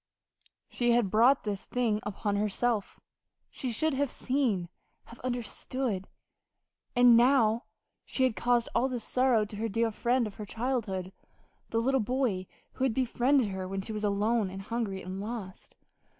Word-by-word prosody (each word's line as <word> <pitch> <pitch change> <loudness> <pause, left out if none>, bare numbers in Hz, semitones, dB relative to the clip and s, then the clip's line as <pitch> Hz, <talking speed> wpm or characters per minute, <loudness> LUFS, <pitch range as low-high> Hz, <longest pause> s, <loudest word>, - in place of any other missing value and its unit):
She 240 -1 +1
had 235 -5 +2
brought 245 +6 +5
this 205 -3 -4
thing 230 -4 0
upon 205 0 -2
herself. 210 +1 -1 0.5
She 255 - -3
should 310 +7 +1
have 280 0 0
seen 245 -12 0 0.4
have 235 - -13
understood. 245 -3 -3 0.9
And 245 -1 +7
now 235 -1 +4 0.4
she 260 - -1
had 255 -4 +2
caused 240 -1 +2
all 250 +3 +2
this 245 -3 -3
sorrow 250 -4 +3
to 210 0 -9
this 225 +2 -2
dear 230 +2 +1
friend 240 +3 +1
of 205 -2 -8
her 210 - -6
childhood 215 -6 -2 0.6
the 225 - -1
little 265 +4 +2
boy 220 -5 -1 0.2
who 260 - -4
had 255 -4 +1
befriended 255 -1 +2
her 190 -1 -4
when 195 +1 -3
she 220 +3 -6
was 215 0 -4
alone 210 +1 +1
and 195 +1 -7
hungry 215 -3 -3
and 185 +2 -5
lost.... 210 -4 -7
230 Hz, 160 wpm, -29 LUFS, 205-250 Hz, 0.9 s, And